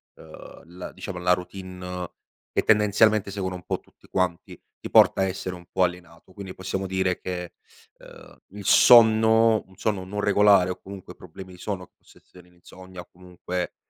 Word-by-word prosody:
uhm, 80 -1 -14
la 90 - -7
diciamo 95 -3 -8
la 90 0 +1
routine 90 -1 -5 0.4
che - - 0
tendenzialmente 105 -1 +3
seguono 95 -2 -4
un 90 - -10
po' - - -3
tutti - - -27
quanti, 90 -3 -3 0.2
ti - - -7
porta - - +5
a - - +3
essere 95 -1 -5
un 90 0 -15
po' 95 - +1
alienato. 90 0 -5
Quindi 95 -1 -9
possiamo 95 +1 -4
dire 95 -1 -1
che, 90 -1 -6 0.5
ehm, - - -16
il 100 0 -11
sonno 110 -1 +5
un 95 -1 -21
sonno 100 -3 -2
non 100 +2 -6
regolare 100 -2 +4
o 90 - -8
comunque 95 -2 -11
problemi 90 +1 -12
di - - -14
sonno, 95 -3 -5
possa - - -23
essere 90 -1 -19
l'insonnia 95 +1 -14
o 90 - -16
comunque 90 0 -6
95 Hz, 175 wpm, -24 LUFS, 90-100 Hz, 0.5 s, porta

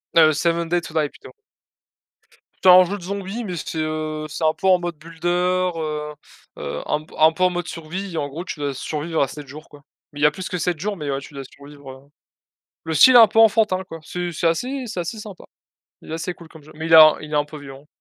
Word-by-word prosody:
heu, 160 -2 +6
7 170 +2 -1
Days 175 -1 +1
to - - -12
Die, 155 -2 0
plutôt. - - -15 1.3
C'est 185 - +6
un 180 0 +9
jeu 195 +3 -4
de - - -13
zombies, 200 +4 -5
mais 180 -3 -5
c'est, 160 0 -6
heu, 155 0 -3
c'est 155 - -6
un 155 0 +3
peu 190 - -3
en 185 -1 +5
mode 175 -2 -5
builder, 175 +3 -1
heu 150 -1 -4 0.4
heu, - - -5
un 150 - -1
p - - -19
un 155 +1 +6
peu 180 +3 -2
en 185 - +5
mode 175 0 -4
survie 175 +4 -6
et - - -3
en 145 - -1
gros, 150 +5 -7
tu 170 - -7
dois 145 -1 -2
survivre 155 +4 -3
à 140 - +2
7 145 0 -10
jours, 150 +4 -12
quoi 145 -1 -16 0.3
mais 145 - -10
il - - -2
y - - +7
a 150 - +5
plus 180 +4 -7
que 180 - -3
7 175 0 -1
jours, 205 +3 -3
mais 150 -3 -5
ouais, 135 - -2
tu 145 - -13
dois 135 - -6
survivre, 140 0 -13
heu 135 +1 -15 0.8
le 160 - -4
style 260 - +7
est - - +10
un 225 - +9
peu 225 - -1
enfantin 215 -4 +4
quoi, 165 -3 -10
c'est 175 +2 -5
c'est 170 +1 -2
assez 255 +11 -2
c'est 210 -5 -4
assez 175 +6 -5
sympa. 210 -3 -10 0.6
Il - - -12
est - - -3
assez 165 +2 -4
cool 170 -2 -15
comme 160 -2 -15
jeu, 155 - -15
mais 160 +1 -6
il 165 - -2
est 160 - +10 0.2
il 155 0 -10
est - - +1
un 145 - +2
peu 150 +1 -11
violent. 135 0 -12
165 Hz, 265 wpm, -21 LUFS, 150-180 Hz, 1.3 s, est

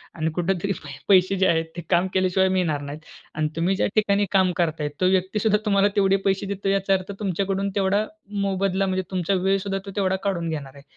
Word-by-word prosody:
आणि 160 -1 -1
कुठेतरी 185 +2 0
पै 145 - -8 0.2
पैसे 190 0 +5
जे 190 0 +3
आहेत 165 -2 +2
ते - - -3
काम 180 +1 +3
केल्याशिवाय 190 0 +2
मिळणार 175 -6 0
नाहीत. 145 +1 -7 0.4
आणि 155 0 0
तुम्ही 175 +4 +1
ज्या - - +1
ठिकाणी 205 -1 +3
काम 190 -2 +4
करताय, 160 -4 0
तो 185 - +4
व्यक्ती 190 +2 +1
सुद्धा 210 0 +3
तुम्हाला 200 -1 +3
तेवढे 195 -1 +3
पैसे 195 0 +1
देतो, 195 0 -2
याचा 195 0 +2
अर्थ 185 +1 -4
तुमच्याकडून 195 0 -1
तेवढा 200 +1 +2 0.4
मोबदला 195 0 0
म्हणजे 190 0 -1
तुमचा 185 0 0
वेळ 195 +1 +3
सुद्धा 195 -1 -1
तो 200 - -7
तेवढा 190 -2 +1
काढून 175 -4 -1
घेणार 140 -4 -5
आहे. 140 - -14
190 Hz, 210 wpm, -24 LUFS, 175-195 Hz, 0.4 s, पैसे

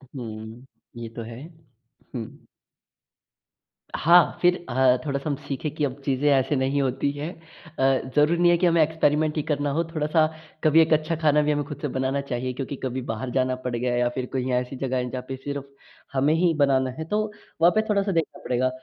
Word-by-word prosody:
हुँ, 110 0 -8 0.3
ये 115 -1 -6
तो 115 - -5
है। 115 - -9 0.7
हुँ। 115 -3 -7 1.5
हाँ 170 +2 +5
फ़िर 180 0 +5
अ, 130 0 +4
थोड़ा-सा 140 +1 -2
हम 145 - 0
सीखें 140 +2 -3
कि 150 - -2
अब 135 +1 -5
चीज़ें 140 +1 +1
ऐसी 135 +2 +2
नहीं 135 +2 +1
होती 135 +1 0
हैं। 145 +4 -5 0.5
अ, 135 -1 +2
ज़रूरी 150 +3 +4
नहीं 175 0 +6
है 175 - +4
कि 180 - +1
हमें 170 -2 +4
एक्सपेरिमेंट 155 0 +1
ही 150 - 0
करना 145 -1 -1
हो, 165 +4 +1
थोड़ा-सा 155 0 +1 0.4
कभी 155 +1 +6
एक 160 0 +3
अच्छा 155 +2 +1
खाना 150 -1 +4
भी 150 - +1
हमें 145 0 0
खुद 145 - -7
से 150 - -1
बनाना 130 +1 -1
चाहिए 130 -1 -3
क्योंकि 135 +2 -5
कभी 130 0 -2
बाहर 110 +4 -4
जाना 130 0 +1
पड़ 125 -1 -1
गया 120 +1 -1
या 120 0 +2
फ़िर 125 +1 -4
कहीं 130 0 -1
ऐसी 125 +1 -1
जगह 130 -1 -2
है 125 0 -2
जहाँ 125 0 -5
पे 135 - -3
सिर्फ़ 140 +1 -5 0.5
हमें 140 +3 +3
ही 170 0 +3
बनाना 130 -2 +2
है - - -2
तो 210 +5 0 0.4
वहाँ 175 +1 +7
पे 215 - +4
थोड़ा-सा 200 -1 +1
देखना 165 -3 -2
पड़ेगा। 130 +1 +1
140 Hz, 205 wpm, -25 LUFS, 130-155 Hz, 1.5 s, वहाँ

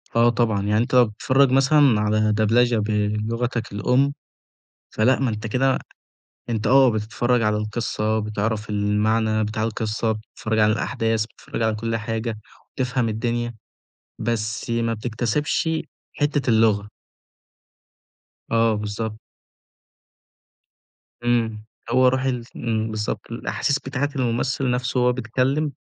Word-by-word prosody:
آه 120 +1 +5
طبعًا، 110 -4 +1
يعني 105 +1 +1
أنت 120 +3 0
لو 125 -1 +7
بتتفرّج 130 +5 +2
مثلًا 135 -3 +4
على 105 0 +2
دبلجة 115 +2 +3
بلغتك 110 +3 -1
الأم 125 +7 +2 0.8
فلأ، 125 +5 +2
ما 130 -3 +1
أنت 110 0 -4
كده 130 +4 +2 0.7
أنت 110 -1 -1
آه، 135 0 +6
بتتفرّج 115 +3 0
على 105 -1 +1
القصة 110 0 -1
بتعرف 105 +1 -2
المعنى 110 +1 +1
بتاع 110 +1 -2
القصة 110 0 -1
بتتفرّج 110 0 -3
على 105 0 +4
الأحداث 110 0 -1
بتتفرّج 115 - -8
على 110 -1 +1
كل 115 +1 -2
حاجة، 115 0 -3 0.3
وبتفهم 125 -2 -1
الدنيا 120 +1 -2 0.6
بس 110 0 -2
ما 115 0 0
بتكتسبش 120 +8 -1 0.5
حتة 145 -3 0
اللغة. 110 -2 +3 1.6
آه 115 -1 +3
بالضبط. 105 +1 -4 2.1
إمم، 115 -3 0 0.3
هو 130 +1 +4
روح 130 +1 +2
ال 125 -3 -1
إمم، 110 -2 -2
بالضبط، 105 +1 -4
الأحاسيس 140 +4 -1
بتاعة 140 +2 -2
الممثل 125 +1 0
نَفْسه 125 +1 -1
وهو 125 0 +4
بيتكلم 130 +5 0
115 Hz, 120 wpm, -23 LUFS, 110-125 Hz, 2.1 s, لو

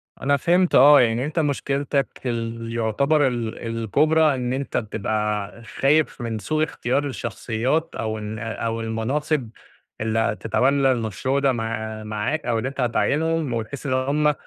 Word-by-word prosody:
أنا 140 +1 +1
فهمت 175 +5 +2
آه 145 +2 +8
يعني 120 +1 +1
أنت 155 +3 -2
مشكلتك 140 -2 0 0.2
ال 115 -1 -3
يعتبر 135 +6 +2
ال 120 -3 -3 0.2
الكبرى 150 +7 +3
إن 125 -1 -2
أنت 135 +1 -2
بتبقى 105 0 -2
خايف 145 +5 +1
من 115 -2 -3
سوء 155 +10 0
اختيار 140 -2 -1
الشخصيات، 135 +3 -2
أو 110 -1 -2
إن 105 0 -5
أو 115 0 -3
المناصب 125 +4 -1 0.5
اللي 110 0 0
هتتولي 130 +6 +2
المشروع 125 +3 -1
ده 140 -1 +3
مع 110 -2 -4
معاك 110 +9 -2
أو 115 -2 +1
إن 110 - -3
أنت 135 0 -3
هتعينهم 150 +4 +1
وتحس 115 +5 -4
إن 135 - 0
هم 145 +3 +2
125 Hz, 145 wpm, -23 LUFS, 115-145 Hz, 0.5 s, آه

